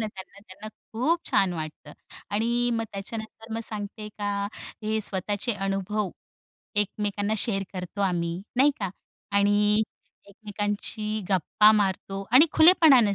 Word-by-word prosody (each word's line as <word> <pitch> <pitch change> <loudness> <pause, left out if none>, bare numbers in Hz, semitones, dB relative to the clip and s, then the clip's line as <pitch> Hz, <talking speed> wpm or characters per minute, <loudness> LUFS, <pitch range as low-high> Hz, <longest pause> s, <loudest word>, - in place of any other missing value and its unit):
ना 220 - -1
त्यांना 195 -1 -10
त्यांना 200 +2 -10
खूप 260 +10 -2
छान 190 -2 +3
वाटतं. 155 -2 -7 0.4
आणि 235 +3 +1
मग 225 -1 -1
त्याच्यानंतर 220 +2 -7
मग 225 - -2
सांगते 210 0 -4
का 200 -1 -1 0.4
हे 220 +1 0
स्वतःचे 205 +4 -1
अनुभव 195 0 -2 0.6
एकमेकांना 205 0 0
शेअर 195 -3 +2
करतो 185 +1 -6
आम्ही 175 -2 -1 0.2
नाही 280 +3 +6
का? 195 -3 -2 0.5
आणि 205 +1 +4 0.5
एकमेकांशी 210 +1 -3
गप्पा 205 +3 +5
मारतो 195 -1 0
आणि 265 +7 +8
खुलेपणाने 310 - +6
205 Hz, 125 wpm, -26 LUFS, 195-220 Hz, 0.6 s, आणि